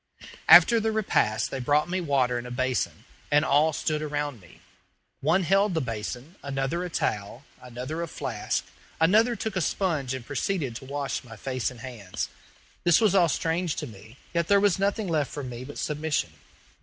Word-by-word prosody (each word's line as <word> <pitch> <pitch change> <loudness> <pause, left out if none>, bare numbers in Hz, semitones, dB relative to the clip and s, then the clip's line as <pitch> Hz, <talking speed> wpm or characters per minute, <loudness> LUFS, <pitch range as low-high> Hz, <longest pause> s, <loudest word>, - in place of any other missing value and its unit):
After 235 -1 +9
the 220 0 0
repast 110 - +1
they 135 - -3
brought 145 +5 +2
me 185 +1 -1
water 130 -6 +1
in 120 - -7
a - - -7
basin, 130 0 -2 0.2
and 145 +1 +4
all 150 +3 +4
stood 155 0 -1
around 145 -5 -3
me. 90 -1 -18 0.6
One 175 +7 +2
held 195 +2 +3
the - - +2
basin, 125 - -5
another 135 +5 -2
a 180 - -4
towel, 110 -3 -2 0.2
another 125 +6 -5
a 170 - -2
flask, - - -3 0.3
another 220 +9 +4
took 220 -3 -4
a 185 - +1
sponge 150 -7 0
and 130 -2 -7
proceeded 145 -2 -2
to 135 - -11
wash 140 +1 -3
my 115 -3 -11
face 130 +2 -2
and 125 -3 -12
hands. 115 -8 -5 0.5
This 175 -2 +5
was 215 -4 +3
all 180 -4 +5
strange 165 +1 0
to 150 - -4
me, 110 0 -13 0.2
yet 170 -1 +1
there 200 0 +5
was 200 -2 +2
nothing 200 +1 0
left 155 -5 0
for 145 - -5
me 125 -1 -6
but 145 +3 -9
submission. 150 - -1
145 Hz, 185 wpm, -27 LUFS, 125-175 Hz, 0.6 s, After